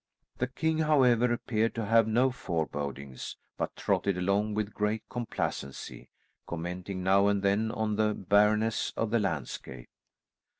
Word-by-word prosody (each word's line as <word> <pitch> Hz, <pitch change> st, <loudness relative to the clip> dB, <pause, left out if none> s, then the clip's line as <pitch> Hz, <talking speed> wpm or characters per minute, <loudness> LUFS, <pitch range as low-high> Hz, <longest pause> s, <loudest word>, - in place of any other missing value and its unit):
The 125 Hz, -, +1 dB
king, 160 Hz, +5 st, -1 dB
however, 125 Hz, -6 st, +4 dB
appeared 115 Hz, -1 st, 0 dB
to 115 Hz, -2 st, -2 dB
have 115 Hz, +1 st, +4 dB
no 125 Hz, +4 st, +3 dB
forebodings, 75 Hz, -, -4 dB, 0.2 s
but -, -, -3 dB
trotted 100 Hz, -2 st, 0 dB
along 100 Hz, +3 st, +1 dB
with 105 Hz, -1 st, -2 dB
great 105 Hz, +1 st, -1 dB
complacency, 110 Hz, -, -4 dB, 0.4 s
commenting 90 Hz, +2 st, -4 dB
now 100 Hz, +2 st, +4 dB
and 100 Hz, -1 st, +1 dB
then 100 Hz, +3 st, +2 dB
on 110 Hz, -2 st, -1 dB
the 105 Hz, -1 st, +2 dB
barrenness 105 Hz, +3 st, +2 dB
of 115 Hz, -2 st, -1 dB
the 115 Hz, -, +3 dB
landscape. 80 Hz, -, -4 dB
105 Hz, 135 wpm, -29 LUFS, 95-115 Hz, 0.4 s, however